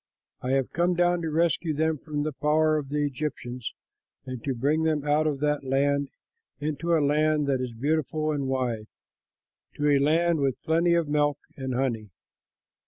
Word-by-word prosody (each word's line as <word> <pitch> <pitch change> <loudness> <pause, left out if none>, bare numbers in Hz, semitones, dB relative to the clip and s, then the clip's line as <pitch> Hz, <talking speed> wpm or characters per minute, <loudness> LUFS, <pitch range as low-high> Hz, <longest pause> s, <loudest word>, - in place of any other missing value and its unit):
I 130 +1 -1
have 135 -2 +1
come 175 +1 +2
down 175 0 +2
to 165 - -2
rescue 160 0 +1
them 160 0 0
from 150 -1 -3
the 155 0 -2
power 155 +2 +2
of 140 -2 -7
the 145 0 0
Egyptians 130 -4 -4 0.5
and 130 -3 -6
to 135 -2 -1
bring 145 +6 +1
them 155 -2 0
out 150 +1 +2
of 145 -2 -2
that 150 -1 +1
land 140 +1 +1 0.5
into 155 +3 0
a 150 - +2
land 150 +1 +2
that 135 -2 0
is 125 -1 -3
beautiful 155 +4 0
and 140 -3 -2
wide, 125 -5 -1 0.9
to 150 - 0
a 140 - +4
land 165 +3 +2
with 135 -3 0
plenty 170 +2 +3
of 170 -2 +1
milk 145 -1 +1 0.2
and 130 -2 -4
honey. 120 -5 -1
150 Hz, 175 wpm, -26 LUFS, 135-155 Hz, 0.9 s, a